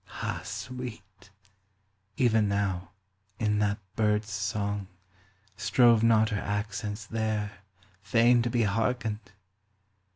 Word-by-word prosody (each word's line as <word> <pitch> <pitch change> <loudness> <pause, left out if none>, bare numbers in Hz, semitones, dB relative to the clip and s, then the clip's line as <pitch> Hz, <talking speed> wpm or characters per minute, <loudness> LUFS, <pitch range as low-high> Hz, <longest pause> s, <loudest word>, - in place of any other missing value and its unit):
(Ah - - -2
sweet! 110 -7 -8 0.9
Even 115 -6 +3
now, 100 -3 -1 0.5
in 105 -1 +1
that 100 -1 +1 0.2
bird's 105 -1 +1
song, 100 0 -2 0.7
Strove 120 -3 +4
not 110 -1 +4
her 105 -3 -2
accents 105 +1 -3
there, 105 -2 -2 0.4
Fain 120 +4 +4
to 120 - 0
be 120 0 +1
hearkened 110 +1 0
105 Hz, 100 wpm, -28 LUFS, 100-115 Hz, 0.9 s, Strove